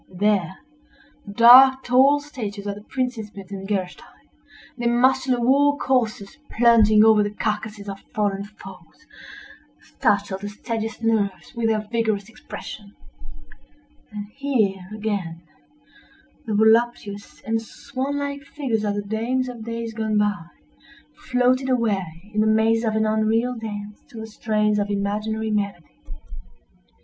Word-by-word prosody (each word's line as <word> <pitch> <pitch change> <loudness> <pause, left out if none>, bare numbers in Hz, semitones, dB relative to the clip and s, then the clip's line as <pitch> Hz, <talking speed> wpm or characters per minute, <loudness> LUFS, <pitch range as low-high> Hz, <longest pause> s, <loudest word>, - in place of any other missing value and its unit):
There, 195 -3 +1 0.7
the 200 - -8
dark, 260 +4 +8
tall 265 +4 +4
statures 220 -9 -7
of 205 - -2
the 205 - -11
Princes 250 -2 -3
Metzengerstein—their 205 +8 -6
muscular 255 +1 +2
war 285 +4 +3
coursers 245 -2 -1
plunging 220 -2 +5
over 220 -1 +6
the 205 - 0
carcasses 210 -1 -3
of 195 0 -6 0.2
fallen 200 -2 0
foes—startled 205 - -6
the 205 - -5
steadiest 225 +1 -5
nerves 210 -3 -1
with 235 -2 -1
their 215 -1 -1
vigorous 220 -3 -1
expression; 205 -2 -10 1.2
and 210 -1 -6
here, 215 -10 -1
again, 200 -6 -4 1.0
the 215 - -1
voluptuous 220 -2 +1
and 225 0 -1
swan 275 +4 -5
like 285 0 -4
figures 265 -6 -3
of 205 -1 -1
the 205 - -3
dames 230 +5 -1
of 240 -3 -8
days 230 0 -5
gone 220 -1 -1
by, 205 -4 0 0.7
floated 255 -3 0
away 195 -9 -1
in 215 - +1
the 215 - +2
mazes 225 +1 +2
of 220 -1 0
an 220 0 +2
unreal 220 +3 +1
dance 210 -2 -7
to 230 - -10
the 220 - -6
strains 215 -1 0
of 205 0 -1
imaginary 210 +2 -2
melody. 200 -5 -3
220 Hz, 125 wpm, -23 LUFS, 205-245 Hz, 1.2 s, dark